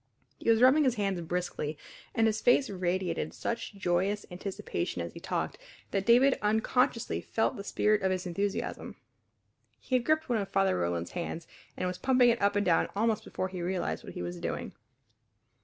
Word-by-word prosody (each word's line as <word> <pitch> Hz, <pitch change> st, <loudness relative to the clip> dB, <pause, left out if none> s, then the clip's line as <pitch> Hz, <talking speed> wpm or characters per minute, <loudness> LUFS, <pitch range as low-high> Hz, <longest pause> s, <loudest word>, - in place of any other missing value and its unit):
He -, -, -1 dB
was 230 Hz, +1 st, +5 dB
rubbing 275 Hz, +4 st, +6 dB
his 255 Hz, -3 st, +2 dB
hands 195 Hz, -4 st, -1 dB
briskly 165 Hz, -3 st, -3 dB, 0.4 s
and 225 Hz, -, +3 dB
his 220 Hz, -1 st, +1 dB
face 245 Hz, 0 st, +4 dB
radiated 185 Hz, 0 st, -2 dB
such 230 Hz, -2 st, -4 dB
joyous 195 Hz, +2 st, 0 dB
anticipation 185 Hz, +2 st, -4 dB
as -, -, -4 dB
he -, -, -9 dB
talked -, -, -3 dB, 0.3 s
that 195 Hz, -1 st, -1 dB
David 255 Hz, +3 st, +5 dB
unconsciously 220 Hz, +3 st, +1 dB
felt 225 Hz, -, 0 dB
the 200 Hz, -, -6 dB
spirit 210 Hz, +1 st, +2 dB
of 190 Hz, -, +2 dB
his 185 Hz, 0 st, -1 dB
enthusiasm. 195 Hz, +3 st, -3 dB, 0.8 s
He -, -, -8 dB
had 250 Hz, -2 st, +4 dB
gripped 310 Hz, +3 st, +1 dB
one 240 Hz, -4 st, +1 dB
of 195 Hz, -1 st, -3 dB
Father 195 Hz, -1 st, +2 dB
Roland's 85 Hz, -1 st, -1 dB
hands 170 Hz, -1 st, -4 dB, 0.3 s
and -, -, -2 dB
was 180 Hz, 0 st, -4 dB
pumping 255 Hz, -2 st, +4 dB
it 230 Hz, -, -2 dB
up 200 Hz, 0 st, +3 dB
and 205 Hz, -, +2 dB
down 170 Hz, -2 st, +3 dB
almost 220 Hz, 0 st, +1 dB
before 185 Hz, -, -3 dB
he 185 Hz, -1 st, -6 dB
realized 180 Hz, +1 st, -2 dB
what -, -, -9 dB
he -, -, -5 dB
was 90 Hz, 0 st, -5 dB
doing. -, -, -4 dB
200 Hz, 185 wpm, -30 LUFS, 180-230 Hz, 0.8 s, rubbing